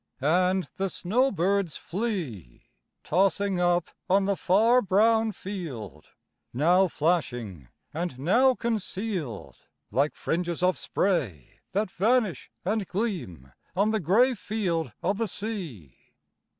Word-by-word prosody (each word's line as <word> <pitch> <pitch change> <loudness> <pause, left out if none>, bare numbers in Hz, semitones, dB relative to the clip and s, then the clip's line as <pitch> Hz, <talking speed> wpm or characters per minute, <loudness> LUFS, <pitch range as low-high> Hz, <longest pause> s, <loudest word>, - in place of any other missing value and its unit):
And 180 +4 +2
the 195 0 0
snowbirds 195 - +1
flee, 170 - -4 0.4
Tossing 195 +2 +1
up 175 -1 +1 0.2
on 195 +1 +4
the 200 0 +1
far 225 +8 +4
brown 220 +3 +3
field, 150 - -7 0.4
Now 175 +9 +4
flashing 120 - -1 0.3
and 165 -4 -3
now 240 - +4
concealed, 200 - -3 0.3
Like 140 +7 +1
fringes 175 0 -2
of 185 0 +3
spray 120 - -2
That 200 0 0
vanish 215 - +1 0.2
and 205 0 0
gleam 170 - -4 0.2
on 205 +3 +2
the 220 - +1
gray 220 - +4
Field 185 - -2
of 195 +4 0
the 225 - 0
sea. 175 - -5
185 Hz, 110 wpm, -27 LUFS, 155-210 Hz, 0.4 s, on